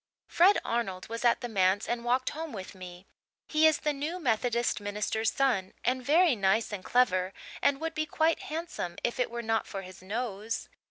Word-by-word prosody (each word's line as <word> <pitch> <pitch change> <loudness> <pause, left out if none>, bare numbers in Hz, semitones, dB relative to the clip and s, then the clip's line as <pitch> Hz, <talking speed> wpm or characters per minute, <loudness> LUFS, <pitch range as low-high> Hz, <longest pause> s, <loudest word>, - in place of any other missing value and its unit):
"Fred 375 +4 +5
Arnold 195 -6 -2
was 230 +1 -4
at 240 +1 +3
the 245 - -3
manse 195 -1 +2
and 240 0 -2
walked 250 +2 +1
home 320 -2 -6
with 190 -2 -7
me. 180 -1 -10 0.4
He 315 0 +5
is 315 - +3
the 300 -1 +1
new 300 +5 -3
Methodist 240 -5 0
minister's 210 +2 -1
son 220 -9 0
and 255 +1 +1
very 315 +2 +4
nice 210 +2 +1
and 190 -3 -5
clever, 185 -7 +2 0.3
and 280 -1 +3
would 325 0 -3
be 310 0 -2
quite 320 +2 +2
handsome 310 - -4
if 240 - -1
it 250 - +1
were 235 0 -5
not 225 0 0
for 195 -2 -5
his 185 0 -12
nose. 215 +1 -4
235 Hz, 195 wpm, -29 LUFS, 200-285 Hz, 0.4 s, Fred